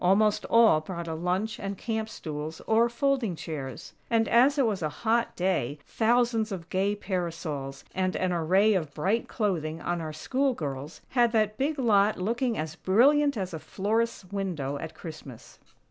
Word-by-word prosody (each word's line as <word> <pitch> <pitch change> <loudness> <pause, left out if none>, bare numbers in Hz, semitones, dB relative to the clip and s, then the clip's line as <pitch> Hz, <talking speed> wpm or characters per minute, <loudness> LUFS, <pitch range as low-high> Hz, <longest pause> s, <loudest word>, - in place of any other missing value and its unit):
Almost 205 +3 +3
all 225 -9 +5
brought 170 +1 -6
a 160 - -3
lunch 185 +7 -1
and 195 0 -4
camp 220 0 -3
stools 155 -5 -6
or 230 +2 +3
folding 235 -5 0
chairs; 140 -5 -6 0.2
and, 225 -1 +2
as 265 +5 +5
it 275 - +4
was 210 -5 -1
a 155 - 0
hot 230 +7 0
day, 175 -7 0
thousands 230 -1 +1
of 175 -4 -6
gay 195 +2 +1
parasols, 165 -8 -4
and 185 0 0
an 185 -1 0
array 190 +6 +3
of 160 -7 -2
bright 195 +9 0
clothing 165 -8 -1
on 175 +1 -2
our 155 -1 -4
school 260 - 0
girls, 145 - -5
had 240 -2 +3
that 215 0 +1
big 295 +3 0
lot 215 -5 +3
looking 230 +5 -1
as 155 0 -4
brilliant 280 +9 +4
as 185 -3 -3
a 160 - -4
florist's 215 +4 -1
window 165 -9 -3
at 160 0 -7
Christmas. 155 -7 -10
195 Hz, 170 wpm, -28 LUFS, 160-230 Hz, 0.2 s, all